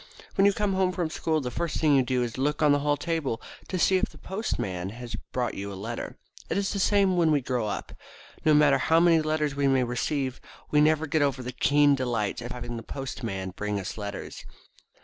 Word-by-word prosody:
When 195 - +3
you 200 - +4
come 205 -1 0
home 190 -1 +1
from 170 -3 -2
school 160 -1 0
the 125 -2 -4
first 170 +2 -2
thing 150 -3 +4
you 135 - +5
do 125 -1 0
is 120 -2 -3
to 130 - -5
look 150 +2 0
on 150 - +5
the 145 - +4
hall 145 0 +1
table 160 -9 -2 0.3
to 185 - -2
see 190 +2 +4
if 195 - 0
the - - -16
Postman 95 - -3
has 120 +3 -7 0.2
brought 125 -1 -1
you 100 +1 -5
a - - -6
letter. 110 +5 -6 0.3
It - - 0
is 200 0 0
the 200 - -2
same 195 -2 +3
when 170 -2 +4
we 150 - +4
grow 125 -4 -2
up. - - -4 0.5
No 155 -1 +5
matter 150 0 +5
how 160 +1 +4
many 165 -1 +5
letters 155 -2 0
we 140 0 +1
may 135 -1 +3
receive 130 +2 -2 0.3
we 150 - +5
never 155 +1 +3
get 155 +1 +1
over 140 -2 0
the 125 - -4
keen 145 +2 +4
delight 120 -6 -1
at 120 +1 -5
having 120 -1 -5
the - - -5
Postman 110 -7 -5
bring 105 +2 -3
us 95 - -5
letters. 105 -1 -6
140 Hz, 230 wpm, -27 LUFS, 120-160 Hz, 0.5 s, you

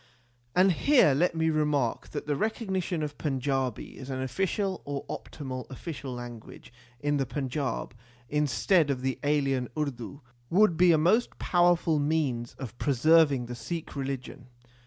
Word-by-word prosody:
And 185 +1 +5
here 245 - +4
let 170 +5 +2
me 160 0 +2
remark 150 -6 0
that 145 - -5
the 145 -1 0
recognition 190 -3 -1
of 145 -1 -5
Panjabi 135 -4 -2
as 130 0 -8
an 130 -1 -3
official 190 - -1
or 140 -1 -4
optional 130 -4 -6
official 135 0 -6
language 120 -2 -9 0.3
in 145 0 +1
the 135 - 0
Panjab, 135 -4 -3 0.4
instead 150 - +2
of 130 -2 -1
the 130 -1 -1
alien 135 -3 +1
Urdu, 140 -2 -4 0.3
would 190 -1 +4
be 175 +1 +5
a 160 - +5
most 185 +10 +2
powerful 175 -3 +3
means 145 -6 -1
of 125 -3 -8
preserving 145 -1 +4
the 120 - -6
Sikh 155 +8 -6
religion. 135 -1 -5
145 Hz, 145 wpm, -28 LUFS, 130-165 Hz, 0.4 s, And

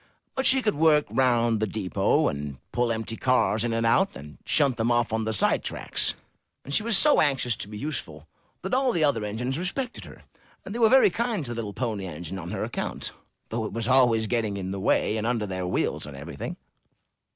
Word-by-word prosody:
But 265 -1 +1
she 265 -1 +4
could 210 - +2
work 150 -1 +4
round 120 -4 +2
the 110 - 0
depot, 95 -3 +1
and 70 -1 -4
pull 120 -1 +1
empty 115 0 -3
cars 120 -3 +2
in 120 - -1
and 115 0 0
out, 115 - +3
and 75 +2 -11
shunt 140 -5 +3
them 115 +1 +1
off 120 -1 +1
on 110 0 0
the 110 - -1
side 110 - +2
tracks, - - -1 0.5
and 140 - -5
she - - +4
was 220 -2 +3
so 300 +5 +5
anxious 135 -6 +1
to - - -5
be 105 0 -8
useful 80 - -5 0.4
that 190 - -4
all 260 -1 +2
the 165 - +1
other 140 -7 +2
engines 125 +7 -3
respected 245 +8 -3
her, - - -14 0.4
and 195 - -6
they 235 - -4
were 225 -2 +5
very 260 -6 +6
kind 225 - -1
to 120 - -4
the - - -4
little 110 -3 -4
Pony 110 -6 -3
Engine 85 +3 -6
on 85 0 -7
her - - -3
account, - - -4 0.4
though 115 0 -2
it 110 - -5
was 115 0 -2
always 125 -4 +4
getting 110 -3 -1
in 95 -1 -4
the 100 - -4
way, 105 +2 +1
and 110 +1 -2
under 120 -3 0
their 95 -2 -4
wheels, 90 - -1
and 70 -2 -9
everything. 70 - -6
115 Hz, 220 wpm, -26 LUFS, 105-145 Hz, 0.5 s, very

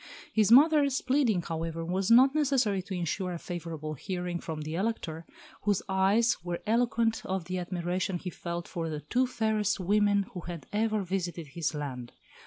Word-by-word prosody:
His 215 -1 +3
mother's 285 0 +6
pleading, 255 -9 +2
however, 165 0 -3
was 185 +3 -1
not 255 +4 +7
necessary 265 -10 +2
to 190 +1 -6
ensure 180 +1 -2
a - - -3
favourable 165 -3 -5
hearing 180 +2 -4
from 160 -2 -5
the 155 +1 -5
Elector, 170 -4 -3 0.3
whose 205 -2 +1
eyes 195 +5 +3
were 175 -1 -4
eloquent 230 0 +1
of 190 -2 -3
the 185 +1 -3
admiration 180 +1 -2
he 180 +1 -6
felt 170 0 -5
for 165 -3 -4
the 150 -1 -4
two 255 +8 +1
fairest 215 -4 0
women 205 +1 +2
who 180 - -5
had 170 -4 -7
ever 215 -1 +1
visited 175 -4 -3
his 165 +2 -2
land. 130 -5 -5
185 Hz, 170 wpm, -29 LUFS, 170-220 Hz, 0.3 s, not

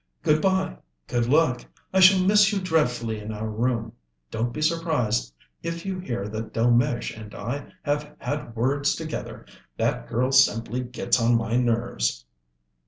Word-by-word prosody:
"Good 155 0 +3
bye, 190 -1 +1 0.3
good 120 - -1
luck. 145 -3 +3 0.3
I 190 - +4
shall 185 0 +7
miss 205 +1 +5
you 205 - 0
dreadfully 125 - 0
in 105 +1 -6
our 110 +1 -4
room. 115 +1 -1 0.4
Don't 120 +2 -1
be 150 - -6
surprised 155 - 0 0.3
if 165 +1 -5
you 190 -1 -3
hear 120 - -4
that 110 +1 -5
Delmege 120 +1 +2
and 110 -2 -10
I 125 +7 -5
have 145 +1 -2
had 145 -5 -4
words 140 +5 +1
together; 160 -1 -6 0.3
that - - -1
girl 125 +3 0
simply 120 -3 +3
gets 125 0 0
on 115 +1 +4
my 115 0 -1
nerves." 115 - 0
125 Hz, 155 wpm, -25 LUFS, 115-155 Hz, 0.4 s, shall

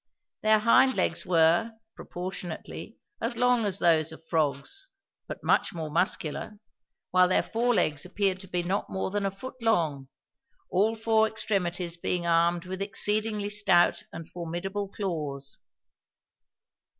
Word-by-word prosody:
Their 215 0 +5
hind 235 +4 +4
legs - - 0
were, 175 +6 +3 0.2
proportionately, 180 -2 -6 0.2
as 235 - -2
long 245 -2 +3
as 195 -2 0
those 160 -4 +3
of 160 0 -13
frogs, 160 - -1 0.4
but - - -7
much 200 - +2
more 160 -2 -4
muscular, 170 +3 -1 0.5
while 185 0 +5
their 185 - +2
fore 240 +1 0
legs 150 -6 +1
appeared 190 0 0
to 190 - -10
be 180 -1 -1
not 190 +4 -2
more 190 0 -3
than 205 0 0
a - - 0
foot 255 +6 -10
long, 160 -12 +1 0.6
all 210 +5 +2
four 220 0 +3
extremities 180 -5 -2
being 175 0 -1
armed 170 +1 +2
with 190 +1 -5
exceedingly 210 +1 0
stout 195 -4 +3
and 165 - -8
formidable 180 +4 -4
claws. 150 -9 -4
185 Hz, 140 wpm, -28 LUFS, 170-210 Hz, 0.6 s, Their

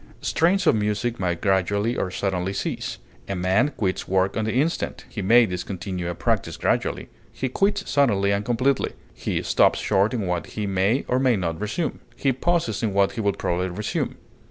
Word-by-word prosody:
Strains 185 +4 +2
of - - +6
music 105 +3 -1
may 90 -2 0
gradually 100 +5 +1
or 95 - -1
suddenly 95 0 -2
cease. - - -3 0.3
A 100 - -1
man 95 +10 +2
quits 95 -3 -1
work 95 +1 +1
on 110 - 0
the 110 - -1
instant; 150 +7 -1
he 105 - -5
may 115 +5 +6
discontinue 90 -1 -4
a 85 - -3
practise - - -1
gradually; - - 0 0.2
he 130 - -3
quits 195 +10 0
suddenly 100 -9 +2
and 100 +1 0
completely; 125 +4 +1 0.2
he - - -2
stops - - +3
short 100 +3 +2
in 115 - -1
what 90 -1 -2
he 105 - -4
may 100 +6 +1
or 125 - +2
may 130 -3 +3
not 85 -2 -2
resume; 110 +11 -2 0.2
he 135 -2 +1
pauses 135 - 0
in 110 -4 0
what 100 -1 +4
he 115 - -4
will 100 -1 +1
probably 90 +1 -1
resume. 100 +4 -3
105 Hz, 185 wpm, -24 LUFS, 95-120 Hz, 0.3 s, of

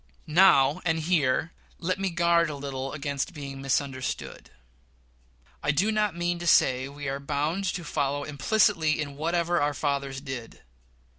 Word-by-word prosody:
Now 155 -4 +5
and 165 -2 +1
here 160 -2 +1 0.3
let 185 +2 -2
me 195 -1 0
guard 170 -1 +2
a 150 - -4
little 135 -1 -5
against 145 +2 -3
being 140 -2 -7
misunderstood. 135 -1 -3 1.1
I - - -2
do 180 +10 +2
not 210 -4 0
mean 175 0 -1
to 175 - -4
say 130 -4 +4
we 145 0 -7
are 135 +1 -2
bound 150 +7 -2
to 180 -1 -2
follow 145 -2 -1
implicitly 155 +1 +2
in 145 -2 -4
whatever 170 +2 0
our 145 0 0
fathers 140 -2 -2
did. 130 -4 -8
150 Hz, 150 wpm, -27 LUFS, 140-170 Hz, 1.1 s, Now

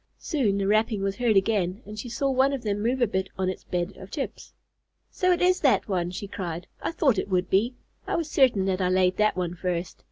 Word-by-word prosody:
Soon 235 - 0
the 200 - 0
rapping 215 0 +2
was 195 0 -1
heard 230 -4 +3
again 195 0 +1
and 210 +1 -8
she 245 - -6
saw 275 +4 -1
one 265 +2 +3
of 265 -3 -4
them 205 -1 -1
move 245 +3 +1
a - - +6
bit 190 -1 -2
on 190 -1 0
its 185 - -5
bed 180 +2 -2
of 190 - -10
chips. 280 +2 -5 0.6
"So 365 0 +1
it 355 0 +2
is 365 0 +4
that 255 -9 +3
one," 180 -4 -1
she 195 +3 -6
cried. 175 -3 -5 0.2
"I - - -2
thought 275 - +2
it - - -4
would 185 -1 0
be. 230 +7 +2 0.3
I - - 0
was 335 -2 -1
certain 255 -10 +3
that 190 0 0
I 180 - +2
laid 185 0 +2
that 215 -3 +2
one 175 -2 -1
first." 175 -1 -3
200 Hz, 245 wpm, -26 LUFS, 185-245 Hz, 0.6 s, a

